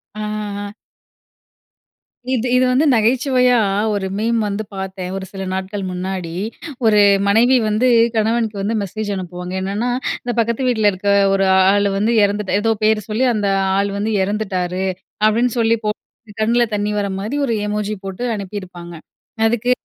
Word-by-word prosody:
ஆ. -, -, -7 dB, 0.5 s
ஆ. -, -, -8 dB, 1.6 s
இது, 250 Hz, -1 st, 0 dB
இது 255 Hz, -, +4 dB
வந்து 265 Hz, +5 st, +3 dB
நகைச்சுவையா 250 Hz, +2 st, +3 dB, 0.4 s
ஒரு 195 Hz, -2 st, -2 dB
மீம் 230 Hz, +2 st, +1 dB
வந்து 205 Hz, +1 st, -2 dB
பாத்தேன் 190 Hz, -1 st, -5 dB
ஒரு 190 Hz, -, -5 dB
சில 195 Hz, -1 st, -6 dB
நாட்கள் 190 Hz, +2 st, -4 dB
முன்னாடி. 180 Hz, -2 st, -4 dB, 0.5 s
ஒரு 210 Hz, -2 st, +5 dB, 0.3 s
மனைவி 235 Hz, +6 st, +4 dB
வந்து 215 Hz, +4 st, +2 dB, 0.3 s
கணவனுக்கு 220 Hz, -1 st, 0 dB
வந்து 215 Hz, +3 st, -1 dB
மெசேஜ் 205 Hz, +2 st, -4 dB
அனுப்புவாங்க 180 Hz, -1 st, -6 dB
என்னன்னா, 205 Hz, +6 st, -2 dB, 0.3 s
"இந்த 245 Hz, -, -3 dB
பக்கத்து 235 Hz, +3 st, 0 dB
வீட்ல 220 Hz, -4 st, +3 dB
இருக்கிற 200 Hz, +1 st, 0 dB, 0.2 s
ஒரு 195 Hz, 0 st, +2 dB, 0.3 s
ஆளு 205 Hz, 0 st, +2 dB
வந்து 215 Hz, +4 st, +1 dB
எறந்துட்டாரு" 205 Hz, -1 st, 0 dB
ஏதோ 225 Hz, -, +2 dB
பேரு 215 Hz, 0 st, +3 dB
சொல்லி 220 Hz, +5 st, +1 dB
"அந்த 210 Hz, -2 st, -1 dB, 0.3 s
ஆள் 200 Hz, 0 st, 0 dB
வந்து 215 Hz, +2 st, -1 dB
இறந்துட்டாரு."அப்டின்னு 195 Hz, +3 st, -1 dB
சொல்லி 230 Hz, 0 st, +3 dB
போட்டு 210 Hz, +1 st, -7 dB
கண்ல 235 Hz, +2 st, +3 dB
தண்ணி 205 Hz, 0 st, -1 dB
வர 200 Hz, -, -1 dB
மாதிரி 215 Hz, +8 st, -4 dB
ஒரு 235 Hz, -, -1 dB
எமோஜி 210 Hz, 0 st, -2 dB
போட்டு 195 Hz, +5 st, -6 dB
அனுப்பியிருப்பாங்க. 185 Hz, -4 st, -7 dB, 0.5 s
"அதுக்கு, 240 Hz, +2 st, 0 dB
210 Hz, 145 wpm, -19 LUFS, 195-230 Hz, 1.6 s, ஒரு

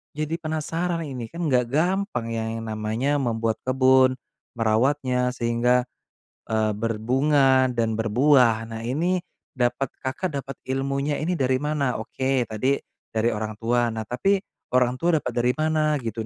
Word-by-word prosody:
jadi 155 Hz, +2 st, -2 dB
penasaran 165 Hz, +2 st, -2 dB
ini, 125 Hz, -6 st, -5 dB
kan 170 Hz, +5 st, -6 dB
nggak 125 Hz, -5 st, +2 dB
gampang 175 Hz, -, 0 dB
ya 115 Hz, 0 st, -2 dB
yang 115 Hz, -, -5 dB
namanya 110 Hz, +7 st, -1 dB
membuat 115 Hz, -3 st, -1 dB
kebun, 130 Hz, 0 st, +4 dB, 0.4 s
merawatnya, 125 Hz, +2 st, +1 dB
sehingga, 120 Hz, +1 st, +2 dB, 0.6 s
eee, 110 Hz, -1 st, +1 dB
berbunga 130 Hz, +4 st, +3 dB
dan 115 Hz, -1 st, +1 dB
berbuah, 115 Hz, 0 st, +4 dB
nah 115 Hz, 0 st, -7 dB
ini 165 Hz, +10 st, 0 dB, 0.3 s
dapat 125 Hz, +1 st, 0 dB, 0.2 s
Kakak 145 Hz, +6 st, -3 dB
dapat 135 Hz, -1 st, -5 dB
ilmunya 135 Hz, +2 st, -1 dB
ini 175 Hz, +2 st, -1 dB
dari 130 Hz, 0 st, +1 dB
mana? 150 Hz, -4 st, 0 dB
Oke, 130 Hz, +2 st, -1 dB
tadi 130 Hz, +6 st, +1 dB, 0.4 s
dari 115 Hz, +1 st, +2 dB
orang 110 Hz, -1 st, -3 dB
tua, 120 Hz, 0 st, +1 dB
nah 110 Hz, -, -3 dB
tapi 190 Hz, -, 0 dB, 0.3 s
orang 125 Hz, 0 st, +3 dB
tua 165 Hz, -2 st, +2 dB
dapat 125 Hz, -, -3 dB
dari 125 Hz, +1 st, +1 dB
mana 155 Hz, +1 st, +1 dB
gitu? 115 Hz, -1 st, -4 dB
130 Hz, 145 wpm, -24 LUFS, 115-145 Hz, 0.6 s, kebun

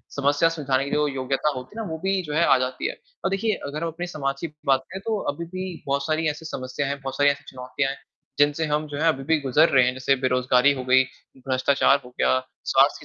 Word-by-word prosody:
समस्या 145 Hz, +3 st, +3 dB
समझाने 140 Hz, -5 st, 0 dB
की 140 Hz, -, -6 dB
जो 150 Hz, 0 st, +2 dB
योग्यता 135 Hz, +1 st, -1 dB
होती 130 Hz, +9 st, -8 dB
है 225 Hz, -, -3 dB
ना -, -, -5 dB
वो 160 Hz, -, -3 dB
भी 195 Hz, 0 st, +1 dB
जो 150 Hz, -3 st, -5 dB
है 165 Hz, +3 st, +3 dB
आ -, -, +5 dB
जाती 130 Hz, 0 st, -2 dB
है -, -, -6 dB, 0.3 s
और -, -, +3 dB
देखिए 205 Hz, +2 st, 0 dB
अगर 150 Hz, +2 st, -5 dB
हम -, -, 0 dB
अपनी 170 Hz, +2 st, -5 dB
समाज 140 Hz, -5 st, -2 dB
की 170 Hz, -, -2 dB, 0.2 s
बात 135 Hz, -1 st, +3 dB
करें, 190 Hz, -, -7 dB
तो 220 Hz, -1 st, 0 dB
अभी 170 Hz, +4 st, -6 dB
भी 185 Hz, 0 st, -6 dB
बहुत 140 Hz, 0 st, 0 dB
सारी 155 Hz, 0 st, 0 dB
ऐसी 150 Hz, +2 st, -6 dB
समस्याएँ 135 Hz, -1 st, -3 dB
हैं, 140 Hz, -, -4 dB
बहुत 135 Hz, -1 st, -5 dB
सारी 145 Hz, 0 st, +5 dB
ऐसी 140 Hz, 0 st, -2 dB
चुनौतियाँ 130 Hz, +2 st, -2 dB
हैं, 135 Hz, -, -8 dB, 0.4 s
जिनसे 145 Hz, +2 st, +3 dB
हम 150 Hz, 0 st, -1 dB
जो -, -, -3 dB
है 165 Hz, -, +3 dB
अभी 135 Hz, -4 st, +1 dB
भी 160 Hz, -, +3 dB
गुज़र 140 Hz, +4 st, +4 dB
रहे 130 Hz, -2 st, +5 dB
हैं, 125 Hz, -, +1 dB
जैसे 130 Hz, +1 st, +1 dB
बेरोज़गारी 125 Hz, +1 st, +3 dB
हो -, -, -3 dB
गई, 130 Hz, +1 st, +5 dB, 0.4 s
भ्रष्टाचार 135 Hz, +2 st, +3 dB
हो -, -, -11 dB
गया, 65 Hz, 0 st, +3 dB, 0.3 s
स्वास्थ्य -, -, +4 dB
140 Hz, 250 wpm, -24 LUFS, 130-160 Hz, 0.4 s, आ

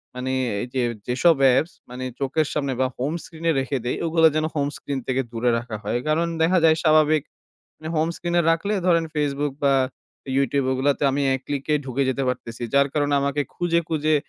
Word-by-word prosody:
মানে, 130 Hz, +1 st, -3 dB, 0.3 s
এই 125 Hz, -, -4 dB
যে 130 Hz, -, 0 dB, 0.3 s
যেসব 155 Hz, +7 st, +4 dB, 0.2 s
apps, 160 Hz, +4 st, 0 dB, 0.2 s
মানে, 125 Hz, +1 st, -6 dB, 0.2 s
চোখের 145 Hz, +2 st, 0 dB
সামনে 140 Hz, -3 st, -1 dB
বা 130 Hz, -, +3 dB
home 145 Hz, +7 st, -2 dB
screen-এ 165 Hz, 0 st, -2 dB
রেখে 135 Hz, +1 st, -1 dB
দেই, 125 Hz, -, -1 dB
ওগুলো 165 Hz, 0 st, +5 dB
যেন 155 Hz, 0 st, +1 dB
home 145 Hz, 0 st, 0 dB
screen 140 Hz, -2 st, -4 dB
থেকে 130 Hz, 0 st, +1 dB
দূরে 120 Hz, +1 st, 0 dB
রাখা 120 Hz, -2 st, -5 dB
হয়। 120 Hz, +4 st, -1 dB
কারণ 165 Hz, +2 st, +2 dB
দেখা 180 Hz, +3 st, +4 dB
যায়, 160 Hz, -1 st, +6 dB
স্বাভাবিক, 155 Hz, -1 st, +4 dB, 0.5 s
মানে, 155 Hz, -, -7 dB
home 160 Hz, +2 st, +1 dB
screen-এ 175 Hz, 0 st, 0 dB
রাখলে, 200 Hz, +6 st, 0 dB
ধরেন, 165 Hz, -2 st, +3 dB
Facebook 145 Hz, -1 st, -1 dB
বা 140 Hz, -, +4 dB, 0.6 s
YouTube, 140 Hz, 0 st, +1 dB
ওগুলাতে 140 Hz, +2 st, 0 dB
আমি 140 Hz, +1 st, 0 dB
এক 130 Hz, -, -7 dB
click-এ 145 Hz, +1 st, -1 dB
ঢুকে 130 Hz, +1 st, -1 dB
যেতে 135 Hz, +1 st, -1 dB
পারতেছি। 120 Hz, -1 st, -5 dB
যার 140 Hz, 0 st, +4 dB
কারণে 145 Hz, -1 st, +1 dB
আমাকে 140 Hz, +1 st, 0 dB
খুঁজে 170 Hz, -1 st, +1 dB
খুঁজে 155 Hz, -1 st, +1 dB
145 Hz, 190 wpm, -23 LUFS, 130-160 Hz, 0.6 s, যায়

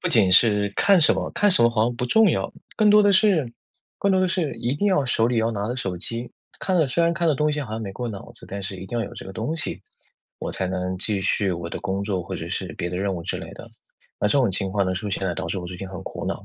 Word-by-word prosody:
不 -, -, -1 dB
仅 95 Hz, -1 st, +4 dB
是 105 Hz, -1 st, +4 dB
看 195 Hz, -3 st, +4 dB
什 155 Hz, -, +5 dB
么 -, -, -3 dB
看 205 Hz, -2 st, +3 dB
什 150 Hz, -, +4 dB
么 120 Hz, -, +5 dB
好 110 Hz, -2 st, +1 dB
像 120 Hz, +1 st, -1 dB
不 125 Hz, -, -2 dB
重 220 Hz, -, +4 dB
要， -, -, -2 dB, 0.2 s
更 215 Hz, -2 st, +5 dB
多 210 Hz, -, +7 dB
的 200 Hz, -, +5 dB
是 190 Hz, -, +3 dB, 0.5 s
更 200 Hz, -, +2 dB
多 190 Hz, 0 st, +3 dB
的 185 Hz, -, +3 dB
是 165 Hz, -8 st, 0 dB
一 120 Hz, +3 st, -2 dB
定 200 Hz, +8 st, +1 dB
要 145 Hz, -8 st, +2 dB
手 115 Hz, -2 st, +2 dB
里 125 Hz, -, 0 dB
要 115 Hz, +1 st, +1 dB
拿 105 Hz, +1 st, -3 dB
着 125 Hz, -, -3 dB
手 95 Hz, -7 st, -2 dB
机。 115 Hz, +5 st, -4 dB, 0.3 s
看 190 Hz, -, -1 dB
了 145 Hz, -, +2 dB
虽 170 Hz, +7 st, +2 dB
然 170 Hz, 0 st, +2 dB
看 170 Hz, -1 st, +1 dB
的 150 Hz, -, +2 dB
东 150 Hz, +1 st, +1 dB
西 150 Hz, -, -2 dB
好 125 Hz, -7 st, -6 dB
像 110 Hz, +1 st, -3 dB
没 100 Hz, -3 st, -5 dB
过 120 Hz, +4 st, -4 dB
脑 100 Hz, -3 st, -8 dB
子， -, -, -4 dB
但 100 Hz, -, -4 dB
是 100 Hz, -, -4 dB
一 95 Hz, -, -8 dB
定 120 Hz, +4 st, -4 dB
要 115 Hz, -, 0 dB
有 -, -, -9 dB
这 -, -, -8 dB
个 95 Hz, -, -8 dB
东 115 Hz, +11 st, -3 dB
西， 160 Hz, -, -3 dB, 0.6 s
我 -, -, -3 dB
才 95 Hz, -, -1 dB
能 90 Hz, 0 st, -3 dB
继 100 Hz, 0 st, 0 dB
续 95 Hz, 0 st, +1 dB
我 85 Hz, -1 st, -5 dB
的 -, -, -4 dB
工 95 Hz, +1 st, -2 dB
作 95 Hz, -4 st, -2 dB
或 -, -, -6 dB
者 80 Hz, -, -5 dB
是 95 Hz, -3 st, -3 dB
别 85 Hz, -, -2 dB
的 90 Hz, -, -4 dB
任 95 Hz, 0 st, -1 dB
务 85 Hz, -, -5 dB
之 -, -, -1 dB
类 -, -, -8 dB
的。 -, -, -11 dB, 0.5 s
那 -, -, +1 dB
这 105 Hz, -, +2 dB
种 125 Hz, -7 st, +3 dB
情 95 Hz, 0 st, -1 dB
况 100 Hz, -1 st, +1 dB
的 95 Hz, -, 0 dB
出 105 Hz, +3 st, -3 dB
现 95 Hz, -, -1 dB
呢， 95 Hz, -2 st, 0 dB
导 -, -, -3 dB
致 90 Hz, +3 st, -2 dB
我 90 Hz, -, -6 dB
最 90 Hz, -, -7 dB
近 95 Hz, +1 st, -7 dB
很 95 Hz, 0 st, -8 dB
苦 -, -, -6 dB
恼。 -, -, -4 dB
110 Hz, 335 characters per minute, -23 LUFS, 95-145 Hz, 0.6 s, 多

